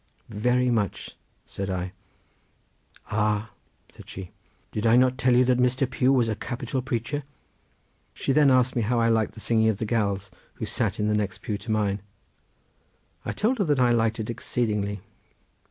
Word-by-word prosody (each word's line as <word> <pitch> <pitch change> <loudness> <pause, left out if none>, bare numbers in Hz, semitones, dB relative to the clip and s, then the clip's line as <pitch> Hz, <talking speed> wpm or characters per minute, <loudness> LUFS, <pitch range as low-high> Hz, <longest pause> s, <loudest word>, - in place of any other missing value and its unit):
"Very 125 +4 +1
much," 105 -5 -2 0.3
said 100 0 -5
I. 90 -1 -2 1.2
"Ah," 105 0 0 0.4
said - - -15
she, 95 -2 -8 0.4
"did 105 +2 -1
I 115 - +6
not 130 +1 +4
tell 130 -1 +3
you 125 +1 +5
that 125 0 +2
Mr. 125 +1 +2
Pugh 130 +1 +2
was 125 -4 +3
a 110 - -1
capital 125 +4 -3
preacher?" 125 +4 -2 0.9
She - - -1
then 150 -1 +5
asked 130 -1 +3
me 120 - +1
how 120 +3 +1
I 115 0 +3
liked 110 -1 +1
the - - -10
singing 110 0 +2
of 110 - 0
the 110 - -2
gals 100 -4 -1 0.2
who - - -4
sat - - -1
in 105 - +1
the 105 - +2
next 105 -2 -2
pew 105 - -2
to - - -10
mine. 105 -2 0 1.2
I - - -2
told 235 +4 0
her 200 - +2
that 145 -4 +2
I 125 -1 +4
liked 115 -1 +1
it 110 +1 -3
exceedingly. 105 -4 -2
115 Hz, 180 wpm, -26 LUFS, 105-125 Hz, 1.2 s, I